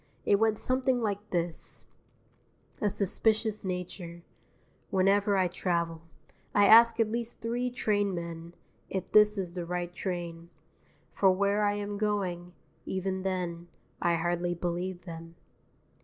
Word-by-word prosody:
It 200 - +4
went 220 -1 +2
something 255 +1 +1
like 205 -2 -3
this: 170 -2 -3 1.0
A 210 - +2
SUSPICIOUS 215 +2 +2
NATURE 180 -2 -5 0.7
_Whenever 195 +1 +3
I 185 -1 +3
travel 170 -2 -2 0.5
I 205 - +6
ask 230 +2 +7
at 220 -1 +2
least 235 0 -3
three 240 +2 -1
train 205 -5 0
men 170 0 -7 0.3
If 190 - -4
this 210 0 +6
is 180 -3 -3
the 175 -1 -4
right 175 0 -3
train 170 -2 -5 0.6
For 190 -2 +4
where 200 +2 +1
I 205 0 +2
am 205 0 -4
going, 185 -5 -2 0.3
Even 190 0 -3
then 175 -3 -3 0.3
I 170 -1 +2
hardly 175 +1 -1
believe 175 +1 -3
them. 165 -1 -9
190 Hz, 130 wpm, -29 LUFS, 175-210 Hz, 1.0 s, ask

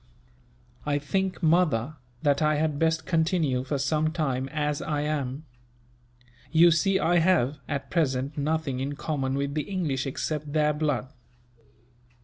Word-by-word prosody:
"I 145 -1 0
think, 190 +6 -2
mother, 155 -5 +2 0.3
that 145 -1 +2
I 155 0 +3
had 150 -1 0
best 160 -1 +1
continue, 160 -6 +1
for 140 +2 -2
some 155 +3 +1
time, 135 -5 -1
as 150 -1 -1
I 150 -1 -1
am. 145 -1 -3 1.1
You 170 +1 +6
see 190 +4 +3
I 175 -1 +3
have, 155 -5 +2
at 140 -2 -4
present, 140 -4 0
nothing 150 -2 -1
in 140 +2 -3
common 135 -3 -2
with 140 0 -2
the 155 - 0
English 155 -9 -1
except 150 +2 -3
their 150 -1 +3
blood. 145 -4 -1
150 Hz, 140 wpm, -27 LUFS, 140-160 Hz, 1.1 s, You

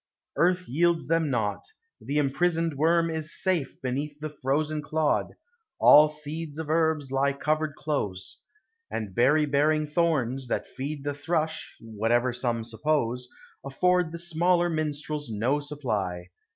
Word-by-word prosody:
Earth 180 +4 +2
yields 170 +5 +1
them 165 -1 +1
naught; 110 -6 -1 0.4
the 145 - -2
imprisoned 165 +3 +1
worm 165 +3 +2
is 160 -1 -1
safe 180 -7 0
Beneath 145 +3 -3
the 155 0 -5
frozen 150 +2 -1
clod; 155 0 0 0.5
all 150 +1 +8
seeds 150 0 -4
of 160 -1 -3
herbs 160 -4 +1
Lie 140 +1 +2
covered 155 +1 -1
close; 100 -14 -3 0.5
and 105 -4 -4
berry 150 +7 +4
bearing 150 +2 +2
thorns, 145 -5 0
That - - -2
feed 140 +2 -6
the 145 0 -2
thrush 160 +2 -2
(whatever 115 +3 0
some 120 -2 -1
suppose), 125 0 -1 0.3
Afford 180 +5 +1
the 170 - -5
smaller 175 +1 +2
minstrels 150 -2 -3
no 115 +7 0
supply. 105 -12 -3
150 Hz, 135 wpm, -27 LUFS, 130-160 Hz, 0.5 s, all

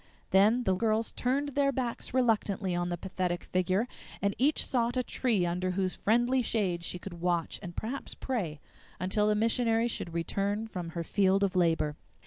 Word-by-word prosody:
Then 215 +6 +5
the 190 - +2
girls 220 +3 +1
turned 275 +4 0
their 280 0 +2
backs 250 -3 -3
reluctantly 215 -6 +1
on 175 0 -1
the 175 - -2
pathetic 180 -1 -2
figure, 185 +5 0 0.3
and 200 0 +1
each 290 +4 +3
sought 240 -1 0
a 250 - +2
tree 225 -8 +1
under 180 +2 -1
whose 185 0 0
friendly 240 +4 +2
shade 190 -7 0
she 180 - -3
could 175 -2 -9
watch, 175 -2 0
and 175 -3 -8
perhaps 245 +6 -4
pray, 185 - -3 0.4
until 200 +3 +1
the 210 - +3
missionary 230 +1 +2
should 175 -7 -4
return 200 +5 -1
from 180 -6 -5
her 170 - -1
field 195 +3 +2
of 195 -1 0
labor. 165 -4 +2
200 Hz, 175 wpm, -30 LUFS, 180-235 Hz, 0.4 s, Then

